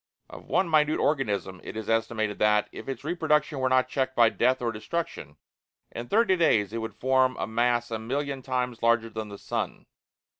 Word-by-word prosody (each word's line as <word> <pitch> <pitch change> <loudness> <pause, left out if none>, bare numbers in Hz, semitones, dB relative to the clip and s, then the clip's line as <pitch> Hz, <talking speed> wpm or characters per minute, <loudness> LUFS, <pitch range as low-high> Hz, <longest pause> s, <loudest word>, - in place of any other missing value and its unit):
Of - - -11
one 190 - +2
minute 155 -1 +3
organism 105 - -1
it - - -7
is 110 - -5
estimated 110 -2 0
that, 105 -1 +3
if - - -9
its 135 -1 -5
reproduction 150 -3 0
were 130 0 +1
not 130 0 +3
checked 130 0 -2
by 115 -1 +6
death 130 +3 +1
or 120 -1 -1
destruction, 110 - -5 0.5
in 120 +1 -6
thirty 210 - +3
days 110 - +2
it 115 - -2
would 110 0 -5
form 130 0 +2
a - - -2
mass 120 +2 0
a 110 - -2
million 135 +4 -3
times 125 -2 -2
larger 115 -1 +2
than 110 -1 -5
the 100 - -8
sun. - - -4
120 Hz, 190 wpm, -27 LUFS, 110-135 Hz, 0.5 s, by